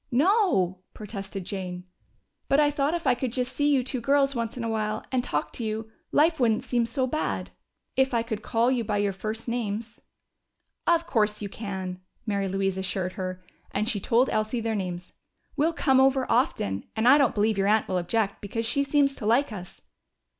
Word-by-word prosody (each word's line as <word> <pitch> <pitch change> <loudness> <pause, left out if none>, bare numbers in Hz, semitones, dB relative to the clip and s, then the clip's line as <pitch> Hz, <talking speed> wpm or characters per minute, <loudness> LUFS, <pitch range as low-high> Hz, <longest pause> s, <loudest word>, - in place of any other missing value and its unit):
"No!" 270 - +3 0.2
protested 195 -3 -6
Jane. 180 -2 -5 0.6
"But 275 - +4
I 295 -1 +4
thought 290 +3 0
if 340 - -4
I 255 - +5
could 245 0 -2
just 250 0 -2
see 290 0 +2
you 275 -3 +3
two 255 0 -2
girls 275 +2 +3
once 235 -1 -3
in 240 - -3
a - - -1
while 215 -1 -2
and 255 -2 +1
talk 150 -8 -2
to 235 - -4
you, 220 0 -3 0.2
life 320 +1 +3
wouldn't 225 -3 +2
seem 240 -2 0
so 255 +3 0
bad. 310 +5 -2 0.4
If 265 0 +3
I 235 -2 +1
could 220 -2 -4
call 235 +3 +2
you 250 -3 +1
by 210 -1 -1
your 205 -1 +1
first 215 +4 -5
names 230 -1 -3 0.4
" - - -49
"Of 335 -1 +3
course 215 -9 +1
you 205 - -5
can," 190 -3 -5 0.3
Mary 200 -3 0
Louise 195 0 -1
assured 190 -1 -2
her, 185 -1 -5 0.3
and 210 +2 -1
she 225 -4 0
told 235 +6 +3
Elsie 215 +2 0
their 225 0 -1
names. 180 -3 -4 0.4
"We'll 305 +3 +2
come 265 -5 +3
over 265 -1 +3
often. 100 - +1
And 220 +2 +1
I 280 +4 +8
don't 275 -4 +3
believe 215 +1 +2
your 195 - +2
aunt 215 +1 +3
will 185 -1 0
object, 200 +3 -1
because 225 +3 -3
she 260 +5 +1
seems 275 0 +2
to 210 - -4
like 245 +4 +3
us." 185 -3 -9
225 Hz, 205 wpm, -26 LUFS, 200-260 Hz, 0.6 s, I